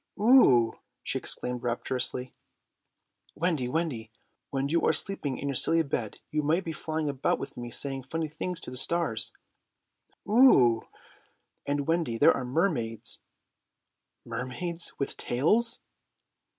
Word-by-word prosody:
"Oo!" 170 Hz, -, +6 dB, 0.3 s
she -, -, -1 dB
exclaimed 125 Hz, -1 st, -2 dB
rapturously. 125 Hz, +1 st, -2 dB, 1.0 s
"Wendy, 160 Hz, -6 st, 0 dB
Wendy, 130 Hz, -8 st, -2 dB, 0.4 s
when 135 Hz, 0 st, -1 dB
you 165 Hz, +3 st, +1 dB
are -, -, +4 dB
sleeping 150 Hz, -9 st, 0 dB
in 140 Hz, -, -4 dB
your 140 Hz, -, -1 dB
silly 165 Hz, +5 st, +3 dB
bed 120 Hz, -7 st, -3 dB
you 155 Hz, -, +1 dB
might 160 Hz, +6 st, +1 dB
be 165 Hz, -, -4 dB
flying 155 Hz, 0 st, -3 dB
about 140 Hz, -2 st, 0 dB
with 135 Hz, +1 st, -7 dB
me 120 Hz, -1 st, -6 dB
saying 135 Hz, +2 st, -4 dB
funny 160 Hz, +5 st, -3 dB
things 165 Hz, +3 st, -4 dB
to -, -, -5 dB
the 125 Hz, -, -6 dB
stars." 145 Hz, -6 st, +1 dB, 1.0 s
"Oo!" 170 Hz, -, +6 dB, 0.9 s
"And, 145 Hz, 0 st, -1 dB
Wendy, 165 Hz, -8 st, 0 dB
there -, -, +6 dB
are 135 Hz, -, -3 dB
mermaids." 125 Hz, -, -1 dB, 1.1 s
"Mermaids! 130 Hz, +9 st, -2 dB
With 140 Hz, -, -3 dB
tails?" 220 Hz, -, +1 dB
140 Hz, 130 wpm, -28 LUFS, 125-165 Hz, 1.1 s, Oo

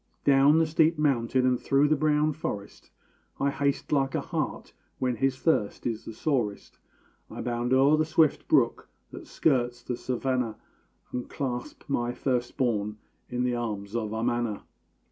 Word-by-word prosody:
Down 140 Hz, +2 st, +5 dB
the 165 Hz, -, +4 dB
steep 160 Hz, +1 st, +3 dB
mountain 130 Hz, -3 st, +2 dB
and 125 Hz, -1 st, +2 dB
through 140 Hz, +2 st, +3 dB
the 155 Hz, -, +3 dB
brown 150 Hz, +1 st, +2 dB
forest, 105 Hz, -9 st, -6 dB, 0.5 s
I 140 Hz, 0 st, +2 dB
haste 140 Hz, 0 st, -1 dB
like 135 Hz, -2 st, +1 dB
a -, -, 0 dB
hart -, -, -4 dB, 0.2 s
when 125 Hz, -2 st, -1 dB
his 135 Hz, -1 st, +1 dB
thirst 130 Hz, -10 st, 0 dB
is 115 Hz, -2 st, -3 dB
the 115 Hz, -, -7 dB
sorest; 115 Hz, -5 st, -2 dB, 0.5 s
I -, -, -8 dB
bound 120 Hz, 0 st, -2 dB
o'er 135 Hz, +4 st, +5 dB
the 155 Hz, -, +3 dB
swift 160 Hz, -2 st, +2 dB
brook -, -, +2 dB, 0.2 s
that -, -, -10 dB
skirts 120 Hz, -5 st, 0 dB
the 125 Hz, -, -3 dB
savannah, 125 Hz, -2 st, -2 dB, 0.5 s
And 125 Hz, -1 st, -4 dB
clasp 125 Hz, -3 st, -4 dB
my 120 Hz, -4 st, -1 dB
first 125 Hz, -1 st, -2 dB
born 105 Hz, -5 st, 0 dB, 0.3 s
in 125 Hz, 0 st, -1 dB
the 125 Hz, -1 st, +1 dB
arms 105 Hz, -3 st, -4 dB
of 110 Hz, -3 st, -2 dB
Amana. 115 Hz, -1 st, -1 dB
125 Hz, 160 wpm, -27 LUFS, 120-140 Hz, 0.5 s, Down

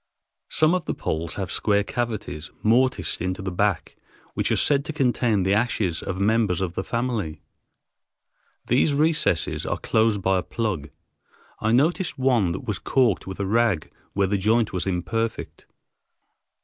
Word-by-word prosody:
Some 155 Hz, +2 st, +3 dB
of 180 Hz, -3 st, -1 dB
the -, -, -2 dB
poles 80 Hz, +1 st, -3 dB
have 95 Hz, -1 st, -4 dB
square 100 Hz, -1 st, +2 dB
cavities, 105 Hz, -9 st, -4 dB
mortised 125 Hz, +1 st, +2 dB
into 90 Hz, +2 st, -2 dB
the 95 Hz, -, -3 dB
back, 100 Hz, 0 st, -1 dB, 0.4 s
which -, -, -1 dB
are -, -, +3 dB
said 140 Hz, -1 st, +3 dB
to 155 Hz, -, -4 dB
contain 120 Hz, -, +1 dB
the 95 Hz, +2 st, +2 dB
ashes 105 Hz, -6 st, 0 dB
of 95 Hz, -1 st, -4 dB
members 105 Hz, -3 st, +2 dB
of 95 Hz, -3 st, -2 dB
the 95 Hz, -, -3 dB
family. 115 Hz, -10 st, -3 dB, 1.2 s
These 140 Hz, +4 st, +2 dB
recesses 150 Hz, -, +2 dB
are -, -, -2 dB
closed 110 Hz, -3 st, +1 dB
by 95 Hz, 0 st, +2 dB
a -, -, -2 dB
plug. 95 Hz, -12 st, -3 dB, 0.7 s
I 110 Hz, -, 0 dB
noticed 155 Hz, +6 st, +2 dB
one 125 Hz, -9 st, +2 dB
that 95 Hz, -, -6 dB
was 105 Hz, -5 st, -2 dB
caulked 125 Hz, -9 st, +1 dB
with 95 Hz, 0 st, -7 dB
a 100 Hz, -, -1 dB
rag 110 Hz, -5 st, +1 dB, 0.2 s
where 100 Hz, 0 st, +2 dB
the 100 Hz, +1 st, 0 dB
joint 110 Hz, +3 st, +2 dB
was 90 Hz, +1 st, -2 dB
imperfect. 105 Hz, +5 st, -3 dB
105 Hz, 160 wpm, -24 LUFS, 95-120 Hz, 1.2 s, Some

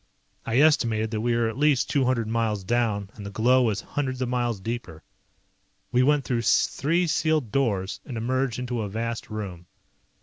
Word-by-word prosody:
I 115 Hz, +1 st, +1 dB
estimated 115 Hz, -8 st, +3 dB
that 110 Hz, -1 st, -2 dB
we 120 Hz, +1 st, +1 dB
were 115 Hz, -1 st, +2 dB
at 115 Hz, +4 st, -5 dB
least 145 Hz, -3 st, +3 dB
two 140 Hz, -3 st, +1 dB
hundred 120 Hz, -3 st, 0 dB
miles 110 Hz, -3 st, -1 dB
down 105 Hz, -2 st, 0 dB
and 105 Hz, -, -10 dB
the 100 Hz, -, -6 dB
glow 120 Hz, +6 st, +3 dB
was 110 Hz, -4 st, +1 dB
hundreds 130 Hz, -3 st, -3 dB
of 125 Hz, -, -2 dB
miles 120 Hz, -4 st, -1 dB
deeper. 95 Hz, -6 st, -6 dB, 0.9 s
We 125 Hz, -, +3 dB
went 145 Hz, +1 st, +3 dB
through 120 Hz, -2 st, 0 dB
three 165 Hz, +8 st, +2 dB
sealed 155 Hz, -7 st, +1 dB
doors 100 Hz, -8 st, -1 dB
and 125 Hz, -5 st, -7 dB
emerged 130 Hz, +1 st, -1 dB
into 125 Hz, -2 st, -3 dB
a 105 Hz, -, -3 dB
vast 115 Hz, +2 st, -4 dB
room. 95 Hz, -5 st, -6 dB
115 Hz, 180 wpm, -25 LUFS, 110-130 Hz, 0.9 s, estimated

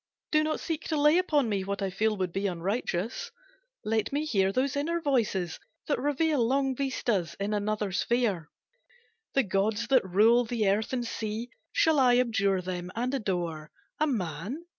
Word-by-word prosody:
Do 305 Hz, 0 st, +4 dB
not 310 Hz, 0 st, -1 dB
seek 320 Hz, -2 st, -4 dB
To 310 Hz, -3 st, 0 dB
lay 300 Hz, +4 st, +5 dB
upon 300 Hz, -8 st, +2 dB
me 200 Hz, -3 st, -1 dB
what 200 Hz, +1 st, -3 dB
I 190 Hz, -, -1 dB
feel 215 Hz, +2 st, 0 dB
Would 185 Hz, -2 st, -1 dB
be 195 Hz, +1 st, 0 dB
unrighteous. 190 Hz, +3 st, -2 dB, 0.6 s
Let 220 Hz, 0 st, 0 dB
me 290 Hz, +2 st, -1 dB
hear 195 Hz, -9 st, +2 dB
Those 260 Hz, +5 st, 0 dB
inner 330 Hz, +4 st, 0 dB
voices 225 Hz, -, 0 dB, 0.3 s
that 290 Hz, -, 0 dB
reveal 290 Hz, 0 st, +1 dB
Long 270 Hz, +2 st, +1 dB
vistas 235 Hz, -, -1 dB
in 200 Hz, +2 st, -1 dB
another 210 Hz, -1 st, -1 dB
sphere. 200 Hz, -6 st, 0 dB, 0.9 s
"The 270 Hz, -, +4 dB
gods 210 Hz, +3 st, 0 dB
that 260 Hz, -2 st, +5 dB
rule 215 Hz, +6 st, +4 dB
the 225 Hz, -3 st, -1 dB
earth 205 Hz, +3 st, +1 dB
and 250 Hz, -2 st, -1 dB
sea, 225 Hz, +1 st, -4 dB, 0.2 s
Shall 320 Hz, -, +3 dB
I 250 Hz, -2 st, +5 dB
abjure 200 Hz, -6 st, +1 dB
them 180 Hz, -1 st, -4 dB
and 250 Hz, +3 st, -1 dB
adore 175 Hz, -, -2 dB, 0.3 s
A 310 Hz, -, +3 dB
man? 210 Hz, -, -3 dB
225 Hz, 170 wpm, -28 LUFS, 195-270 Hz, 0.9 s, lay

